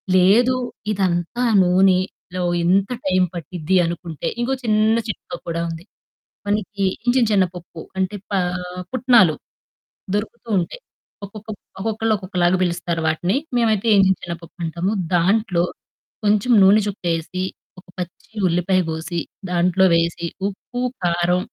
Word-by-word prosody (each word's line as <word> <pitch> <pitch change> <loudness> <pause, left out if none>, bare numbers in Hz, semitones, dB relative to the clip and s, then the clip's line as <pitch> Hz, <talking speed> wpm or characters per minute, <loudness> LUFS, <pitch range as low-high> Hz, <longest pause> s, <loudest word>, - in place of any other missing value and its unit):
లేదు 215 +8 +5 0.4
ఇదంతా 190 +3 0 0.2
నూనెలో, 185 0 +1 0.2
ఇంత 195 +4 +3 0.2
టైం 185 -1 +3
పట్టిద్ది 175 +1 -1
అనుకుంటే, 170 -2 -4
ఇంకో 260 +3 0
చిన్న 215 0 +3
చిట్కా 255 +4 -6
కూడా 170 0 -2
ఉంది. 165 +2 -7 0.6
మనకి 205 -1 -1 0.2
చిన్న, 245 0 +3
చిన్న 195 -2 +4
పప్పు 170 -1 -10 0.2
అంటే, 190 +2 -1 0.2
పా 195 - +2 0.5
పుట్నాలు 235 -10 +5 0.8
దొరుకుతూ 230 +3 -5
ఉంటాయి. - - -6 0.4
ఒక్కొక్క 215 +2 -12 0.3
ఒక్కొక్కళ్ళు 220 +1 0
ఒక్కొక్కలాగా 180 -2 +1
పిలుస్తారు 170 -1 -1
వాటిని. 175 +6 0 0.2
మేమైతే 220 -2 +1
ఏగించిన 190 -1 +4
శనగపప్పు 170 0 -8
అంటాము. 170 +5 -2 0.2
దాంట్లో 180 0 +2 0.6
కొంచెం 210 +4 +3
నూనె 200 +3 +6
చుక్కేసి, 175 -2 -3 0.4
ఒక - - -30
పచ్చి 180 +4 -7
ఉల్లిపాయ 180 +2 +2
కోసి, 160 +2 -4 0.3
దాంట్లో 180 +2 +3
వేసి 170 0 0 0.2
ఉప్పు, 245 +5 -7 0.2
కారం 175 +1 +2
185 Hz, 115 wpm, -21 LUFS, 175-210 Hz, 0.8 s, నూనె